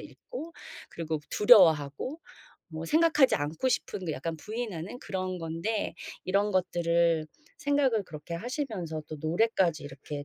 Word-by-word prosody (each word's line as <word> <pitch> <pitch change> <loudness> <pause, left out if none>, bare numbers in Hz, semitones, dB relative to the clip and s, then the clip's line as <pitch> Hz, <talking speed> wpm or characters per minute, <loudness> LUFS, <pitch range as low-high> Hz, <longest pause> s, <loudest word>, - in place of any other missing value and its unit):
있고 335 -9 -9 0.4
그리고 160 -2 -3
두려워하고 185 - +5 0.5
뭐 160 0 -5
생각하지 310 - +4
않고 155 - -1
싶은 185 -8 -2
약간 160 +5 -4
부인하는 210 +1 -5
그런 185 -4 -4
건데 165 +7 -2 0.3
이런 200 +2 +2
것들을 170 -3 +2 0.3
생각을 285 -8 +2
그렇게 155 0 -8
하시면서 210 - -4
또 155 - -6
노래까지 170 -1 +1
이렇게 145 +1 -7
180 Hz, 305 characters per minute, -29 LUFS, 160-230 Hz, 0.5 s, 두려워하고